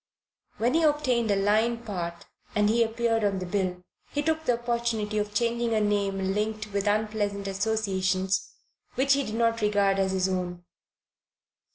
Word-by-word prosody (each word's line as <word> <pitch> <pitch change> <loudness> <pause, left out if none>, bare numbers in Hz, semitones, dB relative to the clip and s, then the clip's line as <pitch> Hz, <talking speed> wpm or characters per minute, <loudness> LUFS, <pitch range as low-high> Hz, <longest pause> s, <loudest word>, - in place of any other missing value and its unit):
When 240 +3 +1
he 330 - +3
obtained 285 -7 +2
a 200 - +3
line 215 +4 +2
part 170 -4 -5 0.3
and 210 0 +3
he 230 +2 +3
appeared 225 0 0
on 200 -1 +1
the 185 - -4
bill, 180 -1 -2 0.3
he 290 - -2
took 315 0 0
the 245 -4 +2
opportunity 235 -3 -1
of 210 0 -2
changing 235 +1 0
a - - +3
name 200 -2 0
linked 215 0 -2
with 200 +1 0
unpleasant 205 -1 0
associations 195 -2 0 0.4
which 275 +2 +3
he 280 - +2
did 215 -3 -5
not 230 0 +1
regard 200 -2 +2
as 190 0 +1
his 190 0 +1
own. 180 -2 -3
210 Hz, 165 wpm, -27 LUFS, 195-235 Hz, 0.4 s, he